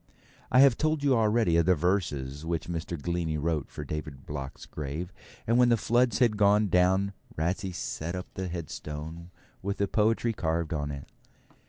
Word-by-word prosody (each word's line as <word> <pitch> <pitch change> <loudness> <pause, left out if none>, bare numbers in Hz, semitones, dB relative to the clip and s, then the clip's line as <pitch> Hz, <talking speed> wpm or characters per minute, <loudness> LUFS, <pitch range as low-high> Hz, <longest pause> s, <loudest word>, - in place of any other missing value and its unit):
I 130 - +7
have 135 -4 +6
told 155 -1 +1
you 140 -2 +4
already 110 -6 +3
of 85 0 +3
the 90 - +5
verses 75 -5 -1
which 80 -1 -2
Mr. 85 -1 -4
Glennie 85 0 -1
wrote 75 -1 -1
for 75 - -7
David 75 -2 -6
Block's 70 -2 -6
grave; 75 +5 -5 0.3
and 115 +2 +3
when 125 -1 +6
the 120 - +4
floods 120 +2 +2
had 115 -5 +3
gone 105 0 +4
down 95 +2 +3 0.2
Ratsey 95 +4 -1
set 85 0 -4
up 90 - -4
the 95 -1 -3
headstone 80 0 -6 0.3
with 100 +1 -2
the 100 - +1
poetry 115 +3 +2
carved 85 -4 -1
on 75 -2 -2
it. 70 -1 -6
85 Hz, 175 wpm, -28 LUFS, 80-105 Hz, 0.3 s, I